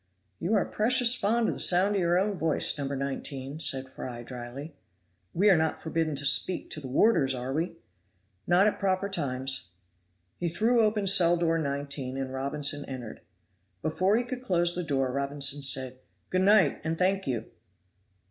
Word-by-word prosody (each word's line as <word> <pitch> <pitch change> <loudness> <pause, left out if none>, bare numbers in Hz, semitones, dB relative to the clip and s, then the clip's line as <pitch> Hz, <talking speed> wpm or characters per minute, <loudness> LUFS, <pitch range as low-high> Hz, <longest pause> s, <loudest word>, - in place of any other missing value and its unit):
"You 195 +6 0
are 200 - +2
precious 245 +2 +3
fond 230 0 +1
of - - 0
the - - -8
sound 190 +3 +3
of 200 - 0
your 175 0 +2
own 200 +2 0
voice, 160 -3 +2
No. 140 -2 -3
19," 140 +1 -5
said 135 -4 -2
Fry 125 -2 -8
dryly. 125 +5 -8 0.6
"We 195 - +2
are - - +6
not 160 -1 0
forbidden 160 -1 -2
to 140 +1 -3
speak 160 +7 0
to - - -4
the 135 - -7
warders, 135 - +3
are 125 +2 -4
we?" 165 +4 -2 0.7
"Not 180 +3 +4
at 210 - 0
proper 195 0 0
times." 130 - -2 0.7
He 175 - -1
threw 230 +7 +2
open 210 -1 +1
cell 175 -3 +4
door 165 -1 +1
19, 140 -2 -4
and 135 -1 -4
Robinson 145 +2 -1
entered. 125 -4 -8 0.6
Before 185 +7 +1
he 240 - 0
could 250 +1 -6
close 175 -7 +1
the 180 - -2
door 135 -4 -1
Robinson 140 +1 +1
said, 130 -2 +1 0.3
"Good 185 - +1
night 190 -6 +4
and 160 0 -2
thank 190 +2 0
you." 120 -4 -3
160 Hz, 175 wpm, -28 LUFS, 135-190 Hz, 0.7 s, are